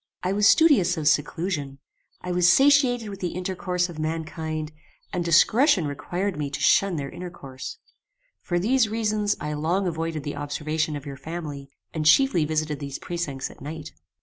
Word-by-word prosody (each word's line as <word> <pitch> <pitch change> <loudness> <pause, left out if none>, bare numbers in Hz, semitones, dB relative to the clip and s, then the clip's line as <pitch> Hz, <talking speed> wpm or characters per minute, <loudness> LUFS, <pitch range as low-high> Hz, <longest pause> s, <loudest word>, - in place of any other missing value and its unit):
"I 185 +1 0
was 205 +1 +4
studious 255 - +5
of 155 -2 -1
seclusion: 150 -2 0 0.4
I 180 - -4
was 175 0 +4
satiated 265 -4 +4
with 195 -1 -8
the 180 -3 -3
intercourse 180 -1 -1
of 170 -3 -9
mankind, 155 0 -3 0.4
and 180 -2 -1
discretion 185 - +4
required 175 +7 -3
me 145 -2 -2
to 140 - -5
shun 195 -2 +3
their 140 -3 -4
intercourse. 155 -7 -8 0.6
For 175 - -1
these 230 +5 +2
reasons 215 -2 0
I 150 +1 -3
long 165 +6 0
avoided 165 -3 -3
the 145 -1 -5
observation 150 +1 -2
of 145 0 -7
your 140 -1 -7
family, 145 -2 -7 0.2
and 155 -2 -1
chiefly 180 - +5
visited 155 -1 -1
these 140 -2 -5
precincts 160 -7 -4
at - - -17
night. 155 +2 -7
165 Hz, 165 wpm, -25 LUFS, 150-190 Hz, 0.6 s, studious